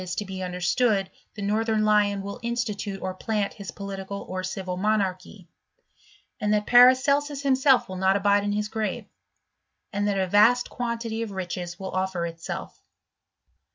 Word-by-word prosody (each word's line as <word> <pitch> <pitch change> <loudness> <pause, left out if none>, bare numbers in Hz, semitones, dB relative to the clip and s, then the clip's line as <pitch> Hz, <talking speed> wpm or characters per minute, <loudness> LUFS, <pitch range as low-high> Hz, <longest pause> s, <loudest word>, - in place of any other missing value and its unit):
is 180 -1 -4
to 210 - -3
be 190 -1 -6
understood 190 +3 0 0.2
the 205 - -6
northern 215 +1 +1
lion 205 -2 +2
will 200 +4 -6
institute 225 -4 -3
or 185 0 -2
plant 205 +1 -2
his 200 -2 -9
political 200 0 -6
or 185 0 -4
civil 185 -1 -4
inoQarchy; 195 -1 -1 0.9
and 210 -2 0
that 210 0 +2
Paracelsus 275 +3 +5
himself 265 -1 +4
will 185 - -6
not 190 +1 +3
abide 200 0 +3
in 205 0 -1
his 210 0 -1
grave; 220 0 -3 0.9
and 205 0 0
that 200 -1 0
a 190 - +1
vast 215 +6 +4
ijnantity 235 -2 -3
of 230 - -3
riches 180 -2 -5
will 190 -1 -5
offer 185 -2 -1
itself. 165 -1 -7
205 Hz, 155 wpm, -25 LUFS, 190-225 Hz, 0.9 s, Paracelsus